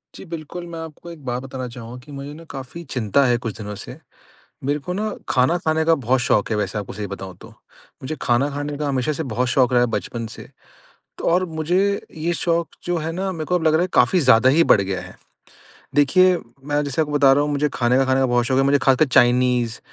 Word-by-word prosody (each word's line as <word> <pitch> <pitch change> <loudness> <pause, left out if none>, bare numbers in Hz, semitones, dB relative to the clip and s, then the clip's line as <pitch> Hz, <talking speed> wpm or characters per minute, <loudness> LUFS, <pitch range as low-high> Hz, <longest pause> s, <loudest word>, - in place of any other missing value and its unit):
जी - - -10
बिल्कुल, 165 +1 -7
मैं 165 -1 -7
आपको 160 +1 -9
एक 160 -4 -12
बात 125 0 -2
बताना 130 -1 -6
चाहूँगा 120 0 -9
कि 145 - -13
मुझे 140 +1 -7
न 160 +2 -11
काफ़ी 135 +5 -8
चिंता 125 +2 +1
है 120 -1 +3
कुछ 115 -3 -6
दिनों 105 -2 -6
से। - - -9 0.7
मेरे 145 +2 0
को 180 - -5
न 215 +3 -1 0.2
खाना 130 +7 +3
खाने 160 -1 0
का 165 0 +4
बहुत 130 -3 0
शौक़ 115 -3 +1
है - - +1
वैसे 105 +1 -2
आपको 100 - -6
सही 105 -1 -5
बताऊँ 95 -2 -8
तो। - - -12 0.5
मुझे 150 +4 -4
खाना 120 +4 +2
खाने 145 +1 -4
का 150 -1 -2
हमेशा 135 +1 0
से 155 - -3
बहुत 125 +2 0
शौक़ 125 0 +2
रहा 125 - +4
है - - +3
बचपन 115 -1 -5
से। - - -11 0.7
तो - - -7
और 180 +2 +3
मुझे 165 +4 +1 0.4
ये 165 +2 -1
शौक़ 170 +1 0 0.2
जो 175 0 -1
है 160 +1 -3
न 190 +3 -2
मेरे 160 -2 -4
को 180 - -1
अब 175 - +1
लग 155 - +5
रहा 160 - +3
है 185 - 0
काफ़ी 125 +9 +4
ज़्यादा 125 -3 +5
ही 165 +5 +4
बढ़ - - +5
गया 95 -1 -2
है। - - -11 0.8
देखिए, 180 +6 +5 0.3
मैं 145 +1 0
जैसे 140 +2 0
आपको 150 -1 -4
बता 140 -2 +5
रहा 140 +2 +3
हूँ 150 - -1
मुझे 145 +1 +1
खाने 120 0 +2
का 135 - +4
खाने 130 0 +2
का 135 - +3
बहुत 120 -1 +2
शौक़ 130 +2 +1
है। - - +2
मुझे 140 +1 +4
ख़ासकर 135 +3 +4
चाइनीज़ 125 -2 +3
140 Hz, 245 wpm, -21 LUFS, 125-160 Hz, 0.8 s, लग